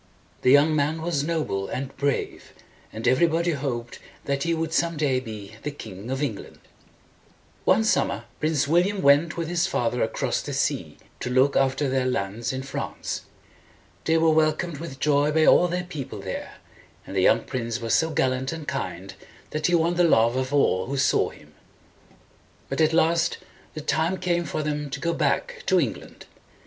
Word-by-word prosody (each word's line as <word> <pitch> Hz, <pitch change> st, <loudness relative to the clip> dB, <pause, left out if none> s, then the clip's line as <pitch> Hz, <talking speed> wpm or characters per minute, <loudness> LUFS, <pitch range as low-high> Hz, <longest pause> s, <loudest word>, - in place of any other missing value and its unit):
The 125 Hz, -, +3 dB
young 145 Hz, +3 st, +5 dB
man 155 Hz, +2 st, 0 dB
was 160 Hz, -5 st, 0 dB
noble 150 Hz, -12 st, -1 dB
and 135 Hz, +1 st, -5 dB
brave, 140 Hz, -1 st, -2 dB, 0.4 s
and 110 Hz, +2 st, -4 dB
every 130 Hz, +7 st, +4 dB
body 170 Hz, +1 st, +1 dB
hoped 125 Hz, -5 st, -4 dB, 0.3 s
that 140 Hz, 0 st, -1 dB
he 170 Hz, -, 0 dB
would 165 Hz, -1 st, -1 dB
some 170 Hz, -1 st, +1 dB
day 140 Hz, -4 st, +1 dB
be 110 Hz, -4 st, -9 dB
the -, -, -3 dB
King 110 Hz, -6 st, -9 dB
of 135 Hz, +2 st, -1 dB
England. 115 Hz, -9 st, -5 dB, 1.1 s
One 220 Hz, -, +4 dB
summer 140 Hz, -, +1 dB, 0.2 s
Prince 150 Hz, -3 st, +1 dB
William 180 Hz, +5 st, +2 dB
went 145 Hz, +4 st, +4 dB
with 165 Hz, -1 st, -2 dB
his 175 Hz, +2 st, +1 dB
father 120 Hz, -8 st, -1 dB
across 110 Hz, -, -1 dB
the -, -, -6 dB
sea -, -, -1 dB, 0.2 s
to -, -, -3 dB
look 130 Hz, +3 st, +3 dB
after 135 Hz, +1 st, +2 dB
their 130 Hz, -1 st, 0 dB
lands 110 Hz, -1 st, -2 dB
in 130 Hz, 0 st, -4 dB
France. 135 Hz, -, -5 dB, 0.8 s
They 160 Hz, 0 st, +3 dB
were 160 Hz, 0 st, +4 dB
wel 155 Hz, 0 st, +4 dB
comed 160 Hz, -2 st, -5 dB
with 155 Hz, -5 st, -7 dB
joy 145 Hz, 0 st, +2 dB
by 160 Hz, 0 st, +4 dB
all 180 Hz, -, +6 dB
their 180 Hz, +1 st, -2 dB
people 155 Hz, -7 st, -7 dB
there, -, -, -6 dB, 0.5 s
and -, -, -8 dB
the -, -, +2 dB
young -, -, +4 dB
prince 115 Hz, -2 st, -3 dB
was 115 Hz, -1 st, -1 dB
so 160 Hz, -, +3 dB
gallant 130 Hz, -3 st, 0 dB
and 160 Hz, -2 st, -7 dB
kind, -, -, -4 dB, 0.4 s
that 155 Hz, 0 st, 0 dB
he 175 Hz, -, +3 dB
won 170 Hz, +1 st, +2 dB
the 175 Hz, -, +4 dB
love 115 Hz, -7 st, +4 dB
of 130 Hz, +1 st, -1 dB
all 120 Hz, -10 st, +2 dB
who 140 Hz, +2 st, -3 dB
saw 135 Hz, -, +2 dB
him. -, -, -17 dB, 1.2 s
But -, -, -1 dB
at 155 Hz, 0 st, +4 dB
last 165 Hz, +1 st, +2 dB, 0.4 s
the 155 Hz, -, -4 dB
time 160 Hz, +5 st, 0 dB
came 175 Hz, -1 st, 0 dB
for 155 Hz, -, -3 dB
them 150 Hz, -1 st, -2 dB
to 140 Hz, +1 st, -5 dB
go 170 Hz, +3 st, 0 dB
back 480 Hz, -, -1 dB
to -, -, +4 dB
England. -, -, -4 dB
145 Hz, 185 wpm, -25 LUFS, 130-165 Hz, 1.2 s, all